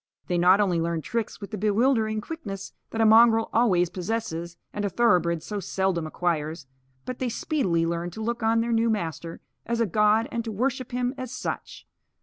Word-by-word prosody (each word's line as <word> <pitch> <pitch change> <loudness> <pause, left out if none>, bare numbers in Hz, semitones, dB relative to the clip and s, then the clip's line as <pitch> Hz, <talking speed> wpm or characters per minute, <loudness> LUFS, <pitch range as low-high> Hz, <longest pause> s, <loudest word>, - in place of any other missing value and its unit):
They 175 -1 0
not 185 +3 +6
only 180 -5 +2
learned 165 -1 -2
tricks 230 -2 -3
with 200 -2 -8
the 210 - -4
bewildering 215 +1 +2
quickness 205 -11 -7 0.2
that 225 - -2
a - - +5
mongrel 225 0 +6
always 185 -7 +3
possesses 175 -4 -4 0.2
and 205 - -3
a 200 - 0
thoroughbred 175 -6 +2
so 210 -1 -4
seldom 190 -3 -1
acquires, 160 -2 -2 0.4
but 255 - -5
they 255 - -1
speedily 205 - 0
learned 170 +1 -3
to 220 - -6
look 235 +1 -2
on 225 +1 +3
their 235 0 -1
new 230 0 +2
master 170 -5 -3 0.2
as 235 +1 -2
a 230 - +3
god 210 +3 +3
and 235 - -2
to 225 - -4
worship 255 +4 -2
him 245 +1 -1
as 255 -2 -5
such. - - -5
210 Hz, 190 wpm, -26 LUFS, 175-230 Hz, 0.4 s, not